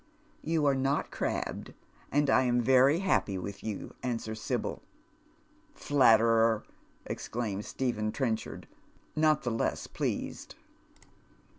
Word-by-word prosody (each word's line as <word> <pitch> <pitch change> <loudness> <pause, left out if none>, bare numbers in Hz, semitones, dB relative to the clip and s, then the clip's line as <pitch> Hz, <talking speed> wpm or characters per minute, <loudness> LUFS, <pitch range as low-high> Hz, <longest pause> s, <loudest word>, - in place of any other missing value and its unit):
" 310 - -34
You 160 -3 +2
are 140 - +4
not 135 +1 0
crabbed, - - -3 0.4
and 145 +1 +2
I 130 - +5
am 120 0 +2
very 130 +6 +4
happy 110 - +1
with 100 +2 -6
you," 105 -3 -5
wswers 115 -3 -3
Sibyl. 120 +1 -3 0.5
" 310 -1 -34
Flatterer," 115 -4 +4 0.4
exclaims 105 -4 -4
Stephen 110 -5 -1
Trenchard. 115 -4 -3 0.5
not 155 -1 +3
the 120 - -1
loss 115 - -1
pleased. - - -4
125 Hz, 120 wpm, -30 LUFS, 110-145 Hz, 0.5 s, I